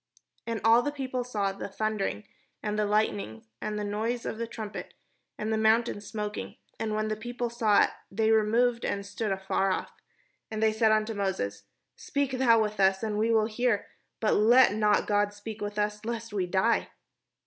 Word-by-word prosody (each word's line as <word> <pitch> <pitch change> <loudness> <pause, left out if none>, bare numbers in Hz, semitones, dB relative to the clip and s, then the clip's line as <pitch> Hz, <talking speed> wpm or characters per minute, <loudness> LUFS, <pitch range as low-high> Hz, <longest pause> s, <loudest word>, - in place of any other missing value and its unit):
And 230 -1 -2
all 230 +2 +6
the 290 - -2
people 260 -3 -3
saw 210 -5 -1
the 195 - -6
thunderings, 200 - -2 0.4
and 210 -1 -1
the 210 - +1
light 210 +1 +3
nings, 110 - -7 0.2
and 210 0 -3
the 210 - -2
noise 220 +4 -2
of 220 - -4
the 230 - -2
trumpet, 220 -3 -7 0.4
and 220 +1 -2
the 220 - +1
mountain 220 0 +2
smoking: 210 0 -5 0.2
and 215 -1 -1
when 215 0 0
the 215 - -1
people 240 +2 -4
saw 220 -4 +4
it, - - 0 0.2
they 220 +2 +1
removed, 230 +2 +3
and 200 0 -2
stood 200 +1 -3
afar 195 0 0
off. - - -2 0.6
And 220 - -5
they 220 0 +3
said 220 0 +3
unto 215 +1 +1
Moses: 105 - -2 0.2
" - - -54
Speak 280 -1 0
thou 250 -3 +4
with 215 -1 -1
us, 190 +1 +3
and 210 -1 -1
we 225 +1 +2
will 220 -1 +4
hear: 225 -1 0 0.3
but 215 - +2
let 235 0 +6
not 210 -1 +2
God 205 0 +1
speak 210 +1 -8
with 205 0 -4
us, 210 0 -1
lest 230 -1 -4
we 190 -3 0
die." 190 +6 +1
215 Hz, 195 wpm, -28 LUFS, 205-230 Hz, 0.6 s, all